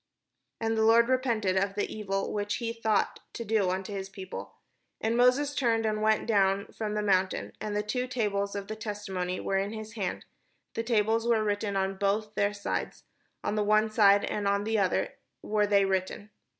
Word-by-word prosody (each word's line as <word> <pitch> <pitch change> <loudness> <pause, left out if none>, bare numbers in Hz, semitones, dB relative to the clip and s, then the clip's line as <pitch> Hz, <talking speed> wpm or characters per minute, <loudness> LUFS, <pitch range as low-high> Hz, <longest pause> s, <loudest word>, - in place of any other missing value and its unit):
" - - -54
And 225 0 0
the 220 - +1
Lord 230 +2 +5
repented 235 -7 +1
of 195 +1 +1
the 205 - -2
evil 195 -2 -2
which 205 +1 -1
he 230 -1 -3
thought 220 -3 0
to 235 - -5
do 210 -3 +2
unto 190 +2 -3
his 195 -1 -4
people. 190 -1 -8 0.4
And 225 +1 0
Moses 255 +4 +3
turned, 230 -5 +1
and 215 -1 0
went 215 0 +2
down 200 -3 +2
from 210 -1 -3
the 210 - 0
mount, 190 -2 +2
and 210 0 -6
the 210 - 0
two 250 +4 -2
tables 205 -5 -1
of 200 -1 -4
the 215 - -4
testimony 195 -4 -4
were 195 0 0
in 200 +2 -2
his 220 0 -7
hand; 195 -6 -3 0.5
the 230 - -1
tables 225 0 +1
were 225 -2 +3
written 205 -1 -1
on 195 0 0
both 210 +2 0
their 205 -1 +1
sides; 205 -1 -4 0.4
on - - -1
the 210 -1 +1
one 215 +1 +3
side 205 -2 +5
and 205 -1 -2
on 200 0 +1
the 220 0 0
other 190 -2 +1 0.3
were 210 -1 +1
they 200 -1 +4
written. 190 +2 -2
210 Hz, 200 wpm, -29 LUFS, 200-225 Hz, 0.5 s, Lord